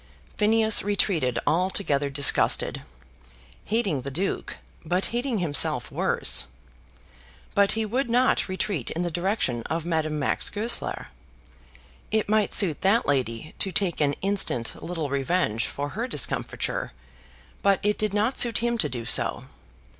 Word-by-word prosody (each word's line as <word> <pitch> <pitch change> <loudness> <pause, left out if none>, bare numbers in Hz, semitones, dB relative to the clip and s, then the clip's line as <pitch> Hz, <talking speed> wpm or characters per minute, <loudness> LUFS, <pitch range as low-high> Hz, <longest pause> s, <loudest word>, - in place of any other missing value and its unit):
Phineas 220 0 +4
retreated 180 - 0
altogether 165 -5 +1
disgusted, 140 0 +3 0.8
hating 205 - 0
the 135 - -5
Duke, 180 +8 -3 0.3
but 180 +4 -1
hating 240 0 -1
himself 160 -7 +1
worse; - - +2 1.1
but 200 0 +4
he 225 0 -1
would 245 +4 -2
not 250 +2 +2
retreat 185 - -3
in 170 - -3
the 175 - -3
direction 175 - -1
of 165 0 -2
Madame 160 -2 -1
Max 140 - 0
Goesler. 220 +3 -2 1.0
It 220 -1 0
might 215 0 +1
suit 175 -8 +3
that 205 +5 +3
lady 130 0 -2
to 195 - -2
take 180 -3 0
an 145 -1 +2
instant 195 - 0
little 165 -5 -4
revenge 135 -5 0
for 145 +1 -5
her 230 +10 -4
discomfiture, 150 - -2 0.7
but 200 -1 +3
it 210 0 0
did 215 -1 0
not 210 +5 0
suit 235 -3 +4
him 235 0 -1
to - - 0
do 120 -3 -6
so. - - +1
185 Hz, 140 wpm, -25 LUFS, 145-215 Hz, 1.1 s, Phineas